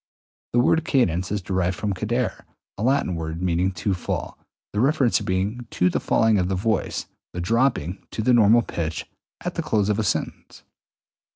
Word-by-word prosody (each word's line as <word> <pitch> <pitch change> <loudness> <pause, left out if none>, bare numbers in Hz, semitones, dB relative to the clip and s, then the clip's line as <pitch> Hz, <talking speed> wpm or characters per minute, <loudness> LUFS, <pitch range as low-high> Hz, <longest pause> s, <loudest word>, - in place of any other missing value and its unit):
The 120 - +4
word 160 +6 +3
cadence 100 - +1
is 105 -2 -2
derived 90 0 0
from 105 -2 -1
cadere, 110 +5 -2 0.3
a - - -7
Latin 130 -5 +2
word 80 -1 -4
meaning 90 +1 +1
to 95 +3 -1
fall, 90 - -4 0.3
the 105 - -1
reference 135 -1 +3
being 100 +6 -2
to 90 0 +2
the - - 0
falling 110 -2 +3
of 90 0 0
the 95 - 0
voice 110 +4 -1
(i.e., - - -36 0.2
the 90 - -5
dropping 110 - 0
to 110 - -3
the 125 - +4
normal 115 0 +6
pitch) 80 -5 -3 0.4
at - - -2
the - - -2
close 105 -2 +1
of 105 +1 +1
a - - +1
sentence. 100 - -3
105 Hz, 185 wpm, -24 LUFS, 90-120 Hz, 0.4 s, normal